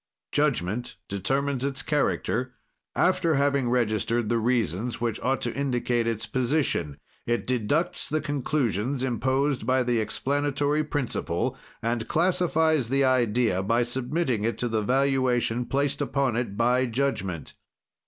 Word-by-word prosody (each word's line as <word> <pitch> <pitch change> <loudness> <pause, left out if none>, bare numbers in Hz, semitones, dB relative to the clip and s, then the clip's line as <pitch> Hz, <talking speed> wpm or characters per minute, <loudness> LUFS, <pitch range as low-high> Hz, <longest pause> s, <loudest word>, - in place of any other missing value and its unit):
"Judgment 105 +8 0
determines 135 +7 -1
its 140 -1 -1
character 130 -4 0 0.4
after 180 -3 +2
having 140 -2 +2
registered 115 -1 +1
the 120 -1 +2
reasons 115 -1 0
which 115 -2 -1
ought 135 +1 0
to - - -2
indicate 125 -3 0
its 110 -1 -1
position; 125 - 0 0.3
it 120 0 0
deducts 145 +9 0
the 155 - +1
conclusions 135 -4 -1
imposed 130 +2 0
by 130 0 +3
the 120 -2 +1
explanatory 145 +6 0
principle, 125 - -2 0.3
and 115 -1 -1
classifies 160 -6 +2
the 135 +1 +2
idea 120 -5 +2
by 115 +5 +2
submitting 125 0 -1
it 115 +1 -1
to 120 - -1
the 110 -2 0
valuation 125 -1 +1
placed 140 0 0
upon 135 -4 0
it 115 -4 -2
by 125 +2 +3
judgment. 105 - -2
125 Hz, 130 wpm, -26 LUFS, 115-140 Hz, 0.4 s, by